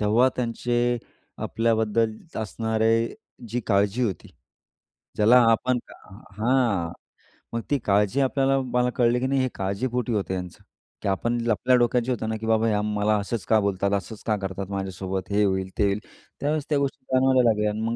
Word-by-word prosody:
तेव्हा 110 +5 +4
त्यांचे 120 0 0 0.4
आपल्याबद्दल 110 -1 +1 0.2
असणारे 110 +1 0 0.3
जी 120 +2 -2
काळजी 100 +3 +2
होती. 100 -5 -4 0.9
ज्याला 110 +4 +6
आपण 125 +2 +2 0.6
हां. 115 -7 +1 0.6
मग 115 - -1
ती 145 - +2
काळजी 105 +5 +2
आपल्याला 135 0 +2
मला 125 -1 0
कळली 120 0 +3
की 130 - -1
नाही 135 0 +1
हे 130 - +1
काळजीपोटी 115 +5 -2
होतं 100 -3 -1
यांचं, 90 -2 -6 0.4
की - - -3
आपण 120 +5 0
आपल्या 125 +4 +3
डोक्यात 120 +1 +1
होत 120 -3 -1
ना? 110 - -1
की 110 - -7
बाबा 110 0 +2
ह्या 105 -2 +1
मला 105 0 +1
असंच 100 -1 -4
का 110 -1 +4
बोलतात? 100 -1 0
असंच 100 +2 -4
का 110 - +2
करतात? 95 0 -4
माझ्यासोबत 95 0 -4
हे 105 +1 +3
होईल 95 -1 0
ते - - +2
होईल? 100 +1 +1 0.4
त्यावेळेस 150 0 -1
त्या 150 - +2
गोष्टी 140 -2 -3
जाणवायला 130 -1 +4
लागल्या 105 -1 +1
आणि 110 +1 -4
मग 115 +1 -1
110 Hz, 165 wpm, -25 LUFS, 100-125 Hz, 0.9 s, ज्याला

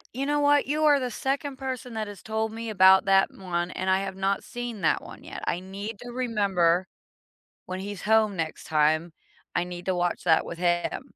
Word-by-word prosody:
You 275 +2 -2
know 295 0 +1
what? 290 -1 +4
You 305 +2 0
are 290 -2 +5
the 250 -1 -2
2nd 270 +3 -2
person 255 -3 -5
that 215 -1 -2
has 205 -1 -10
told 220 0 -2
me 230 0 -5
about 190 -2 +6
that 195 0 +4
one, 175 -2 -3
and 190 0 -3
I 190 +1 +3
have 190 -1 -4
not 195 +1 0
seen 240 -4 -6
that - - +2
one - - -12
yet. - - -8
I 175 - 0
need 200 +3 -7
to 245 - -8
remember 195 -8 +1 0.8
when 185 0 -4
he's 200 -1 -6
home 215 -1 +3
next 165 -2 -4
time. 155 +2 +2 0.4
I - - +2
need 175 0 -7
to 190 - +1
watch 175 0 -1
that 160 -2 +4
with 170 - -7
him. 175 -1 0
195 Hz, 210 wpm, -26 LUFS, 180-240 Hz, 0.8 s, about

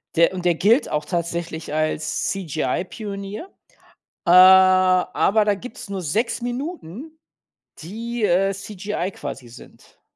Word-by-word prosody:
Der 170 +3 +4
und 180 -1 -5
der 175 -2 +3
gilt 225 - +3
auch 150 0 -2
tatsächlich 170 -2 -4
als 155 0 -1
CGI 160 -5 -2
Pionier. 205 - -7 0.8
Äh, 170 - +4
aber 185 +2 +5
da 205 -1 +2
gibt's 220 -1 -10
nur 195 -1 -4
6 230 - -1
Minuten, 275 - -6 0.6
die, 225 +7 -5
äh, 195 +1 +2
CGI 200 -1 -5
quasi 140 -6 -8
sind. 120 +2 -17
190 Hz, 125 wpm, -22 LUFS, 170-215 Hz, 0.8 s, aber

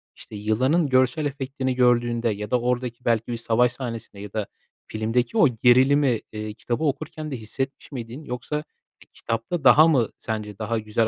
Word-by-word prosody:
işte, - - -12
yılanın 130 +10 +1
görsel 130 +3 +2
efektini 135 -2 -3
gördüğünde 120 -1 +2
ya 105 0 -4
da 125 - +3
oradaki 125 0 -2
belki 115 -1 +1
bir 120 - -2
savaş 115 +1 +2
sahnesinde 115 -5 -7
ya 100 -1 -9
da 105 -2 -2 0.4
filmdeki 115 - -1
o 165 - +7 0.2
gerilimi, 130 0 +5
eee, 105 0 -5
kitabı 120 +6 -3
okurken 155 +1 -3
de 130 - -3
hissetmiş 135 +7 -5
miydin 125 +2 -7
yoksa 125 +4 -4 0.5
kitapta 115 +8 -3
daha 155 +4 +8
mı 130 -9 +3
sence 105 -2 -5
daha 110 +1 -1
güzel 110 +1 0
120 Hz, 165 wpm, -24 LUFS, 110-135 Hz, 0.5 s, daha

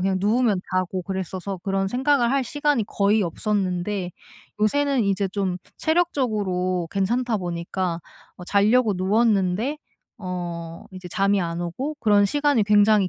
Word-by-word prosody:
그냥 190 +1 +1
누우면 210 -2 +2
자고 185 0 -1
그랬어서 190 +1 -4
그런 195 0 0
생각을 255 +1 +2
할 275 -1 +1
시간이 290 -2 0
거의 205 +1 +2
없었는데 185 0 -1 0.5
요새는 275 +2 +2
이제 195 0 0
좀 190 -2 -2 0.2
체력적으로 210 - 0
괜찮다 225 +4 0
보니까 175 0 -3 0.4
어 180 - -8
자려고 215 +3 +3
누웠는데 205 +5 +1 0.5
어 170 -2 -5
이제 185 -1 -9
잠이 195 +2 +1
안 170 -1 -3
오고 255 - -4
그런 205 -2 +4
시간이 290 0 +2
굉장히 205 -1 +4
200 Hz, 305 characters per minute, -23 LUFS, 185-235 Hz, 0.5 s, 그런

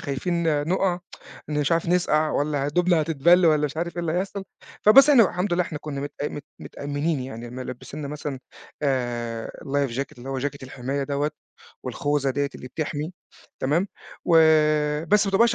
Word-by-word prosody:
خايفين 155 +1 0
نُقع، 185 -1 +1 0.5
مش 150 +1 0
عارف 165 +1 +1
نسقع 155 -3 +2
والّا 145 -1 0
هدومنا 175 +2 +2
هتتبل 165 +3 +4
والّا 155 -2 +4
مش 145 - -8
عارف 170 +1 -3
إيه - - -1
اللي 160 -2 -1
هيحصل. 195 +2 -2 0.4
فبس 270 +7 +8
إحنا 250 -5 +8
الحمد 180 +2 -2
لله 180 +1 +3
إحنا 155 -3 -6
كنّا 140 -2 -5
متأ 145 +1 -4
مت 145 - -8 0.2
متأمنين 145 +1 -2
يعني 120 -2 -7
ملبسينّا 130 +3 -7
مثلًا 145 -2 -5 0.4
آآ، 120 -4 -1 0.2
Life 140 -2 0
Jacket 140 -2 -4
اللي 130 +3 -9
هو 135 -1 -2
Jacket 140 +1 -3
الحماية 130 +2 -3
دوّة، 145 +2 -1 0.6
والخوذة 145 -1 0
ديّة 140 +1 0
اللي 125 - -9
بتحمي. 150 +4 -4 0.5
تمام. 165 +9 +1 0.4
و 170 - +4 0.7
بس 210 +3 +4
ما 195 - 0
بتبقاش 230 +5 +4
150 Hz, 165 wpm, -24 LUFS, 140-175 Hz, 0.7 s, فبس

